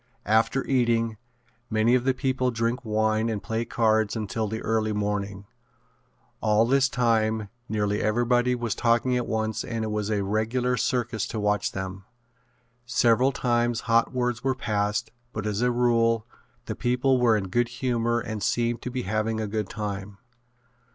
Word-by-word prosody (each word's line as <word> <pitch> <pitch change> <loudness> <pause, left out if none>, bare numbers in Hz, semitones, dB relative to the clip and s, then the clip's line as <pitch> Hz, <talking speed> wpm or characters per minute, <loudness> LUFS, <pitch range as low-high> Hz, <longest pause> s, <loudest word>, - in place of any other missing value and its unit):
After 110 +5 +2
eating, 115 -4 +1 0.5
many 110 +2 +3
of 125 0 +2
the 130 -1 +2
people 130 -1 0
drink 115 +2 -1
wine 110 0 +1
and 105 -3 -3
play 115 +1 -2
cards 110 -2 +1
until 110 0 -2
the 110 +2 -4
early 110 -1 0
morning. 100 -1 -2 1.0
All 110 +1 +3
this 135 +2 +3
time 110 -4 +1 0.2
nearly 105 -1 0
everybody 120 +3 +2
was 120 -3 -2
talking 120 +2 +2
at 125 -1 -1
once 110 -1 -1
and 115 -2 -3
it 110 - -3
was 105 -1 -2
a 105 -2 0
regular 115 +5 0
circus 120 -4 -1
to 110 - -4
watch 105 0 0
them. 95 0 -5 0.8
Several 120 +2 +3
times 120 -2 0
hot 115 -1 +2
words 125 -2 -1
were 130 -1 +1
passed 105 -1 -1 0.2
but 110 -1 -4
as 105 +1 -1
a 125 - +3
rule 115 -2 +2 0.4
the - - -3
people 125 +2 +1
were 115 -3 +4
in 95 -3 -4
good 120 +5 +1
humor 120 -1 0
and 110 -2 -5
seemed 120 +2 0
to - - -4
be 125 0 -3
having 110 +2 -1
a 110 - -1
good 105 -1 -3
time. 100 -2 -5
115 Hz, 165 wpm, -26 LUFS, 110-120 Hz, 1.0 s, were